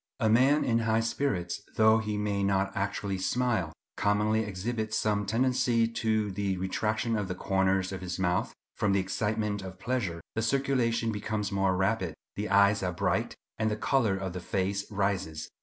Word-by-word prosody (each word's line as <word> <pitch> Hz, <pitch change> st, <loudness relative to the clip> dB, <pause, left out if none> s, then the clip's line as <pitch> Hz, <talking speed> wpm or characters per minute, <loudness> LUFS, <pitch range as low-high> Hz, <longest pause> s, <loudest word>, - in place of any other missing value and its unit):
—A 110 Hz, -3 st, +2 dB
man 135 Hz, +6 st, +4 dB
in 115 Hz, -1 st, +2 dB
high 115 Hz, -1 st, +2 dB
spirits, 115 Hz, -7 st, -1 dB
though 110 Hz, 0 st, +5 dB
he 105 Hz, -1 st, -2 dB
may 105 Hz, -1 st, -1 dB
not 100 Hz, 0 st, +1 dB
actually 100 Hz, -1 st, -2 dB
smile, 115 Hz, -5 st, 0 dB, 0.3 s
commonly 105 Hz, +2 st, +2 dB
exhibits 110 Hz, +2 st, -3 dB
some 105 Hz, -1 st, 0 dB
tendency 120 Hz, 0 st, +2 dB
to 110 Hz, -2 st, 0 dB
the 95 Hz, 0 st, -1 dB
retraction 110 Hz, +5 st, -1 dB
of 105 Hz, -3 st, -1 dB
the 90 Hz, -, -3 dB
corners 95 Hz, 0 st, +1 dB
of 95 Hz, -, -5 dB
his 90 Hz, -1 st, -4 dB
mouth. 90 Hz, -1 st, 0 dB, 0.2 s
From 100 Hz, -2 st, +1 dB
the 100 Hz, -, +3 dB
excitement 105 Hz, +2 st, -1 dB
of 95 Hz, -1 st, -8 dB
pleasure, 110 Hz, -6 st, -2 dB
the 110 Hz, -, -1 dB
circulation 115 Hz, -2 st, +1 dB
becomes 105 Hz, -1 st, -3 dB
more 95 Hz, -2 st, +1 dB
rapid; 95 Hz, -4 st, 0 dB, 0.2 s
the 105 Hz, +1 st, -3 dB
eyes 100 Hz, +1 st, +4 dB
are 90 Hz, -1 st, -1 dB
bright, 85 Hz, -, -1 dB, 0.2 s
and 110 Hz, 0 st, +2 dB
the 105 Hz, -, -1 dB
colour 110 Hz, -6 st, +1 dB
of 95 Hz, -2 st, -4 dB
the 90 Hz, -, -4 dB
face 100 Hz, +2 st, -2 dB
rises. 95 Hz, -6 st, -1 dB
105 Hz, 175 wpm, -29 LUFS, 95-110 Hz, 0.3 s, though